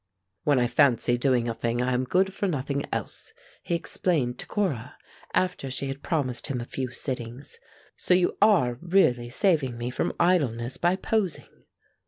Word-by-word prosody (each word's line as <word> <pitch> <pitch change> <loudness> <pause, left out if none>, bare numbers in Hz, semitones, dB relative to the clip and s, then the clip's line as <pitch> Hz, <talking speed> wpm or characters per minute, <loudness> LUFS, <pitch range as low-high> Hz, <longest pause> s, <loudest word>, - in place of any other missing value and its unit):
"When 145 -2 +4
I 125 - +3
fancy 120 -2 +3
doing 120 -1 +1
a 115 - -1
thing 115 +1 -2
I 125 +1 +1
am 125 +1 0
good 190 +8 +1
for 200 - -1
nothing 140 -3 -2
else," 445 - -5 0.3
he 170 - -1
explained 155 -7 0
to - - -5
Cora, 150 - -2 0.4
after 180 -7 0
she 135 +1 -3
had 135 +1 -6
promised 140 -7 -1
him 135 -4 -2
a 120 - -5
few 130 0 -4
sittings. 125 0 -6 0.4
"So 180 - +3
you 180 -1 +2
are 165 - +4
really 165 -10 +2
saving 145 - +1
me 120 +1 -3
from - - -1
idleness 135 -9 +1
by 175 +2 +2
posing." 195 -2 -3
135 Hz, 170 wpm, -26 LUFS, 125-175 Hz, 0.4 s, When